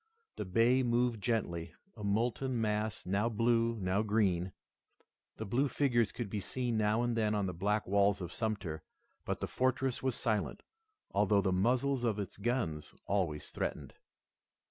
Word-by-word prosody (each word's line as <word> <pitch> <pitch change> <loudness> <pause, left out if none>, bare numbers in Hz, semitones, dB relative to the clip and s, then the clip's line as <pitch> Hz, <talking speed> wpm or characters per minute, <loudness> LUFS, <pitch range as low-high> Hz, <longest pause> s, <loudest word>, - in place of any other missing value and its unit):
The - - -3
bay 115 +7 +3
moved 120 -2 +1
gently, 95 -8 -1 0.2
a 105 - -9
molten 120 +5 0
mass 110 0 -1
now 100 +5 +1
blue, 115 +1 +2
now 95 +2 +1
green. 100 -4 +1 0.9
The 110 - -4
blue 125 +8 +1
figures 120 -4 +2
could 120 - -4
be 105 +1 -3
seen 120 +4 -2
now 110 +2 +2
and 120 -1 0
then 110 -2 +1
on 100 -2 +1
the 90 - -2
black 105 +5 0
walls 100 +1 +3
of 90 -2 -6
Sumter, 100 -8 -3 0.4
but - - -2
the - - -1
fortress 130 0 0
was 130 -3 0
silent, 110 -3 -1 0.5
although 100 0 +3
the 95 - +2
muzzles 125 +7 +2
of 110 -3 +1
its 100 -1 -5
guns 100 - -2
always 90 -7 -1
threatened. - - -4
110 Hz, 160 wpm, -33 LUFS, 100-120 Hz, 0.9 s, bay